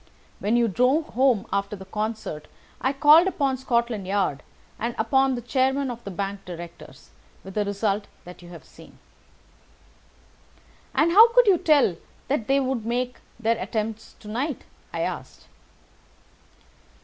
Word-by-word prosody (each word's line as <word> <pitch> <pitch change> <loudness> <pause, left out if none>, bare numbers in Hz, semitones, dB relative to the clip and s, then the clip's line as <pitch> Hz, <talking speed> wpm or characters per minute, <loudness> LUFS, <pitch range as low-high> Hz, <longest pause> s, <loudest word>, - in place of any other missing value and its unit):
When 215 +4 +1
you 235 -1 +3
drove 255 - +1
home 250 -4 +2
after 200 +1 -1
the 190 -1 -11
concert 210 -6 -4 0.3
I 265 - +1
called 300 +5 +6
upon 275 -8 0
Scotland 235 -5 -1
Yard 190 -8 0 0.4
and 235 +1 -3
upon 265 +4 +2
the 240 - -6
chairman 265 +3 0
of 235 0 -9
the - - -6
bank 195 +1 -4
directors, 175 -1 -11 0.3
with 190 - -10
the 210 - 0
result 200 0 -1 0.2
that 180 0 -12
you 175 - -13
have 170 -2 -12
seen." - - -17 2.0
"And 330 +2 +3
how 445 +6 +8
could - - +6
you 385 -5 +4
tell 290 - +3 0.3
that 265 -6 -1
they 275 +1 +3
would 260 -4 -1
make 245 +2 -2 0.2
their 230 0 +1
attempt 220 -1 -4
to 210 - -12
night?" 250 +6 -3 0.3
I - - -3
asked. - - -5
235 Hz, 150 wpm, -24 LUFS, 200-270 Hz, 2.0 s, how